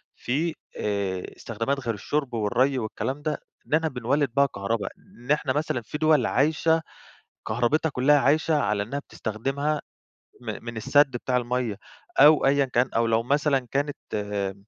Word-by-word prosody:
في، 155 +6 -1 0.2
آآ، 100 -3 -1
استخدامات 115 +5 -2
غير 120 -4 -2
الشرب 135 +5 -2
والري 125 +5 +1
والكلام 130 +5 -3
ده، 155 0 -1 0.3
إننا 160 +1 +2
بنولد 135 +2 0
بيها 140 0 +5
كهربا، 100 -3 -2
إن 125 +4 -9
إحنا 145 -3 +2
مثلًا 145 -4 -1
في 130 +7 -6
دول 155 -5 +3
عايشة، 160 +4 +2 0.7
كهرباتها 120 +8 +1
كلها 145 +3 +4
عايشة 155 +4 +2
على 105 -4 0
إنها 135 +7 -4
بتستخدمها 140 +5 -2 0.6
م 110 -3 -6
من 120 -1 -6
السد 140 +5 +4
بتاع 125 +1 -2
المَيّة، 125 -3 -1 0.4
أو 150 -1 +7
أيًا 140 0 +4
كان، 125 -1 +1
أو 115 0 +3
لو 115 0 +2
مثلًا 140 0 +1
كانت 145 +1 -1 0.2
آآ 100 -2 -2
130 Hz, 150 wpm, -25 LUFS, 115-145 Hz, 0.7 s, أو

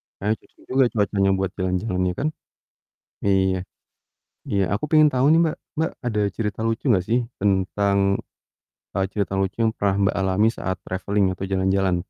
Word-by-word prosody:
Kayaknya 105 +3 0
cocok - - -27
juga 130 0 +4
cuacanya 100 -2 +2
buat 95 -1 -1
jalan-jalan 95 +1 -1
ya - - -2
kan? 145 - +1 1.0
Iya, 95 -1 +3 0.9
iya, 100 -1 +1
aku 100 +9 -1
pengen 155 -1 +6
tau 130 +1 +2
nih 165 - +5
Mbak, 155 - -1 0.2
Mbak 160 - +1 0.2
ada 105 -3 0 0.2
cerita 105 -3 -2
lucu 115 +3 -2
gak 90 - -1
sih 120 +2 +3 0.2
tentang, 100 0 +1 1.0
eee, 95 - +2
cerita 100 -2 -1
lucu 95 0 -1
yang 110 -1 +3
pernah 100 -1 +1
Mbak 100 - +2
alami 95 +3 +2
saat 95 - -2
traveling 100 +2 0
atau 95 +1 -5
jalan-jalan? 95 -1 +2
100 Hz, 165 wpm, -23 LUFS, 95-110 Hz, 1.0 s, pengen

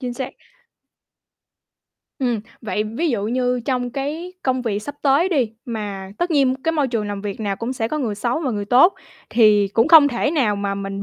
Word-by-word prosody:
chính 250 -2 -4
xác. 260 +1 -5 1.9
Ừm, 245 -5 0 0.2
vậy 210 -1 -2
ví 240 +10 -2
dụ 215 -5 -1
như 250 +1 0
trong 250 -2 -1
cái 295 +7 -4
công 260 -1 0
việc 215 -4 -1
sắp 290 +7 -7
tới 285 +6 +3
đi, 265 - 0
mà 205 -6 -5
tất 350 +1 -1
nhiên 275 -4 +3
cái 325 - +1
môi 295 -4 +1
trường 225 -4 -2
làm 205 -1 -4
việc 205 +1 -5
nào 200 -2 -2
cũng 230 +5 -3
sẽ 225 -3 -2
có 305 - -2
người 235 -7 -2
xấu 240 +8 -1
và 260 - 0
người 205 -3 -3
tốt 255 - +5 0.4
thì 215 -3 +4
cũng 225 +6 +2
không 315 -3 +8
thể 255 +2 -1
nào 250 -10 +1
mà 200 0 -2
mình 195 0 -5
245 Hz, 205 wpm, -21 LUFS, 210-275 Hz, 1.9 s, không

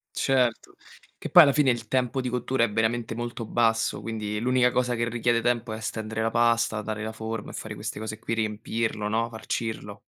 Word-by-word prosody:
Certo, 125 -4 +1 0.4
che - - -7
poi 175 - +10
alla 140 -3 +4
fine 145 -3 +4
il 115 -2 -2
tempo 130 +1 0
di 125 - -2
cottura 125 0 +1
è 115 - -1
veramente 110 +2 0
molto 120 0 -5
basso, 115 0 +1
quindi 105 -2 -3
l'unica 125 +1 +3
cosa 125 0 +1
che 115 0 -1
richiede 120 0 +1
tempo 120 -1 0
è 110 - -5
stendere 110 0 -4
la 110 0 +1
pasta, 115 -2 +2
dare 110 0 -4
la 110 0 -4
forma 110 -1 -5
e - - -10
fare - - -6
queste - - -5
cose 110 0 -5
qui, 115 - -3
riempirlo, 110 0 -2
no, 115 +2 0
farcirlo. 110 0 -4
115 Hz, 200 wpm, -26 LUFS, 110-120 Hz, 0.4 s, poi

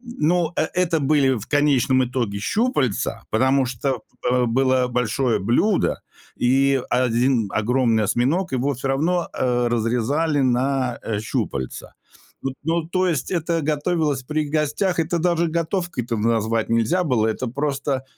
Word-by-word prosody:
Ну, 175 -8 0
э - - +2
это 175 -3 +1
были 140 -1 +3
в 105 - -8
конечном 140 -3 +3
итоге 120 -5 -2
щупальца, 145 - -1
потому 130 +3 +2
что, 125 0 -2 0.3
э, 125 0 +2
было 130 +1 +2
большое 125 0 0
блюдо 125 - +1 0.4
и 135 +2 +2
1 125 -2 +2
огромный 115 0 +1
осьминог, 140 - 0
его 135 +2 0
всё 135 +2 -4
равно, 165 +6 0
э, 125 -1 0
разрезали 125 +7 0
на, 130 0 0
э, 110 -2 -2
щупальца. 70 - -4 0.5
Вот, 135 -1 -3
ну, 165 +1 0
то 185 +1 +1
есть 155 -7 -2
это 170 -1 0
готовилось 150 -2 0
при 155 +4 -2
гостях. 155 +5 0
Это 170 +1 -1
даже 170 0 +1
готовкой-то 165 - -2
назвать 115 0 0
нельзя 115 +11 +2
было. 125 -8 +1
Это 110 +3 -2
просто, 135 0 -2
135 Hz, 140 wpm, -22 LUFS, 120-160 Hz, 0.5 s, были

